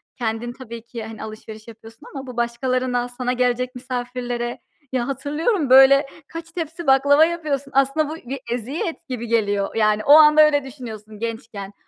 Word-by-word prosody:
kendin 235 0 -3
tabii 235 -3 -9
ki 235 -1 -7
hani 220 0 -8
alışveriş 215 0 -10
yapıyorsun 225 +2 -14
ama 270 -1 -6
bu 250 -2 -9
başkalarına 245 +1 -1
sana 250 0 -2
gelecek 250 0 0
misafirlere. 245 -1 -4 0.3
Ya, 245 0 0
hatırlıyorum 295 - -1
böyle 270 +1 +7 0.2
kaç 330 0 -9
tepsi 330 -2 -6
baklava 285 +3 +5
yapıyorsun, 300 -5 -3
aslında 275 +3 +2
bu 315 - -5
bir 275 +1 -4
eziyet 300 - -4
gibi 235 -2 -4
geliyor. 205 -3 0
Yani 215 -1 +2
o 285 - +7
anda 305 0 +8
öyle 295 -2 +4
düşünüyorsun 220 -5 -10
gençken 225 -3 -6
250 Hz, 155 wpm, -21 LUFS, 230-280 Hz, 0.3 s, anda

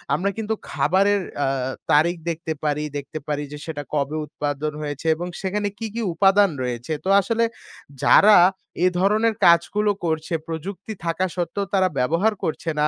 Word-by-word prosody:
আমরা 195 +2 0
কিন্তু 220 0 -1 0.2
খাবারের 195 +7 +2 0.2
আ - - +1 0.4
তারিখ 170 +4 +4
দেখতে 165 0 -3
পারি, 150 0 0
দেখতে 145 +2 -6
পারি 150 -1 -2
যে 150 - -6
সেটা 150 -3 -5
কবে 145 0 -1
উৎপাদন 145 0 -3
হয়েছে 145 +1 -5
এবং 175 +2 -5
সেখানে 205 +2 -1
কী, 225 - -4
কী 235 - -2
উপাদান 195 +2 +4
রয়েছে? 125 +4 -3
তো - - 0
আসলে 230 +4 +1 0.6
যারা 210 +1 +7 0.5
এ - - +6
ধরনের 215 +4 +3
কাজগুলো 190 +5 +4
করছে, 160 0 -2
প্রযুক্তি 180 +6 -6
থাকা 170 +3 0
সত্ত্বেও 185 +3 -2
তারা 190 -1 +4
ব্যবহার 170 +12 +2
করছে 160 +1 -2
না 150 - +4
170 Hz, 160 wpm, -22 LUFS, 150-200 Hz, 0.6 s, যারা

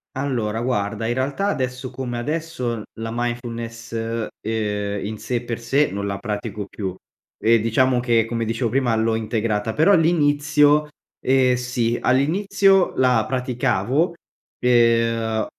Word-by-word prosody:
Allora, 120 -5 -1
guarda, 110 -3 -1
in 120 - 0
realtà 135 +9 -1
adesso 130 -5 -3
come 125 -1 -4
adesso, 130 -4 -3
la 115 0 -5
mindfulness, 120 -1 -4 0.5
ehm, 105 -2 -2
in 110 +1 -5
sé 125 - -3
e 120 - -1
per 120 -1 -4
sé, 135 +5 +1
non 100 +1 -3
la 100 0 -2
pratico 105 0 -4
più. 95 -2 -5 0.4
E, 115 +1 +4
diciamo, 125 +3 +2
che, 120 -2 +2
come 115 0 -2
dicevo, 115 +1 -1
prima 130 -3 +1
l'ho 110 0 +1
integrata. 110 -1 -1
Però 160 - +4
l'inizio, 150 -2 +3 0.4
ehm, 130 -1 +4
sì, 125 -1 -1
all'inizio 195 +8 +3
la 125 -4 +3
praticavo, 130 - 0 0.5
ehm, 115 -2 +2
120 Hz, 135 wpm, -22 LUFS, 115-130 Hz, 0.5 s, E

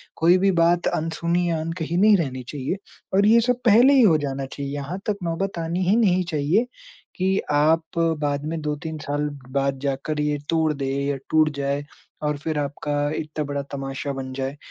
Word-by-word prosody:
कोई 170 +3 +4
भी 195 +1 +3
बात 170 +1 +3
अनसुनी 170 +2 0
या 165 -1 0
अनकही 165 +1 -3
नहीं 210 +3 +6
रहनी 130 -7 -3
चाहिए, 145 +6 -3 0.4
और 200 +1 +4
ये 230 +2 +6
सब 250 +1 0
पहले 240 +5 +7
ही 270 - +6
हो 185 -9 +6
जाना 140 -2 -3
चाहिए, 140 +1 -6
यहाँ 145 +6 -4
तक 205 - 0
नौबत 170 +2 -2
आनी 170 +3 -1
ही 205 - +5
नहीं 185 -6 +3
चाहिए 155 +10 +2 0.5
कि 190 +1 +1
आप 160 +3 +2 0.2
बाद 145 -1 -1
में 160 +1 -3
2-3 155 +2 -4
साल 145 0 -2 0.2
बाद 140 0 0
जाकर 140 +2 -2
ये 150 0 0
तोड़ 160 -2 +2
दे 140 -2 -4 0.2
या 140 0 0
टूट 155 -1 +4
जाए 140 +1 -2 0.4
और 150 -1 0
फिर 155 +1 -3
आपका 145 +1 -3 0.2
इतना 155 0 -3
बड़ा 140 0 -3
तमाशा 135 0 -4
बन 130 -1 -6
जाए। 135 +2 -4
155 Hz, 190 wpm, -23 LUFS, 145-175 Hz, 0.5 s, पहले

